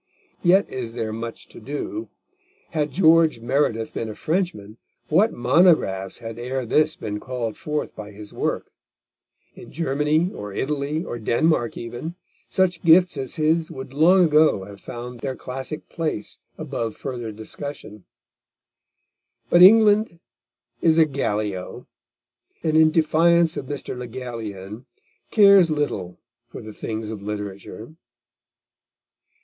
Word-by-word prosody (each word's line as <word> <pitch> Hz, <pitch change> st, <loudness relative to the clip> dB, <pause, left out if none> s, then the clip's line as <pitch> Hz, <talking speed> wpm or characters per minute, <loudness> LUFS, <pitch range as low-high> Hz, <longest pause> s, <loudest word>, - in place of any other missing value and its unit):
Yet 190 Hz, +3 st, +4 dB
is 120 Hz, -3 st, -5 dB
there 115 Hz, -2 st, -3 dB
much 115 Hz, +1 st, -7 dB
to -, -, -12 dB
do. 145 Hz, -, -5 dB, 0.6 s
Had 150 Hz, -2 st, 0 dB
George 165 Hz, -5 st, +4 dB
Meredith 120 Hz, -2 st, 0 dB
been 115 Hz, -, -4 dB
a 105 Hz, -, -7 dB
Frenchman, 155 Hz, -, -2 dB, 0.3 s
what 195 Hz, +9 st, +4 dB
monographs 120 Hz, -, +2 dB
had 115 Hz, -1 st, -8 dB
ere 130 Hz, +1 st, -3 dB
this 155 Hz, +6 st, +2 dB
been 105 Hz, -1 st, -5 dB
called 120 Hz, -2 st, -4 dB
forth 150 Hz, 0 st, -4 dB
by 105 Hz, -1 st, -8 dB
his 105 Hz, 0 st, -11 dB
work; -, -, -3 dB, 0.8 s
in -, -, -13 dB
Germany, 155 Hz, +3 st, 0 dB
or 105 Hz, -1 st, -7 dB
Italy, 145 Hz, -, -2 dB
or 120 Hz, -, -6 dB
Denmark 120 Hz, +2 st, +1 dB
even, 120 Hz, +8 st, -6 dB, 0.3 s
such 180 Hz, -3 st, +1 dB
gifts 175 Hz, +1 st, +5 dB
as 135 Hz, -2 st, -5 dB
his 160 Hz, +1 st, +1 dB
would 130 Hz, 0 st, -8 dB
long 175 Hz, +6 st, +5 dB
ago 155 Hz, -, +3 dB
have 100 Hz, 0 st, -12 dB
found 120 Hz, 0 st, -8 dB
their 130 Hz, +1 st, -4 dB
classic 130 Hz, +5 st, -6 dB
place 155 Hz, -11 st, -4 dB, 0.2 s
above 115 Hz, -2 st, -4 dB
further 120 Hz, -4 st, -5 dB
discussion. 110 Hz, -1 st, -8 dB, 1.5 s
But 175 Hz, -, +6 dB
England 210 Hz, -2 st, +6 dB, 0.6 s
is 160 Hz, -1 st, +4 dB
a 160 Hz, -, +6 dB
Gallio, 105 Hz, -9 st, -3 dB, 0.8 s
and 155 Hz, -2 st, +1 dB
in 160 Hz, 0 st, +6 dB
defiance 165 Hz, +1 st, +3 dB
of 130 Hz, -, -5 dB
Mr. 140 Hz, -2 st, -5 dB
Le 125 Hz, 0 st, -6 dB
Gallienne, 115 Hz, -2 st, -7 dB, 0.4 s
cares 200 Hz, -5 st, +6 dB
little 145 Hz, -, -2 dB, 0.3 s
for -, -, -10 dB
the 110 Hz, 0 st, -9 dB
things 110 Hz, 0 st, -5 dB
of 105 Hz, -3 st, -7 dB
literature. 105 Hz, +3 st, -7 dB
135 Hz, 130 wpm, -23 LUFS, 110-160 Hz, 1.5 s, But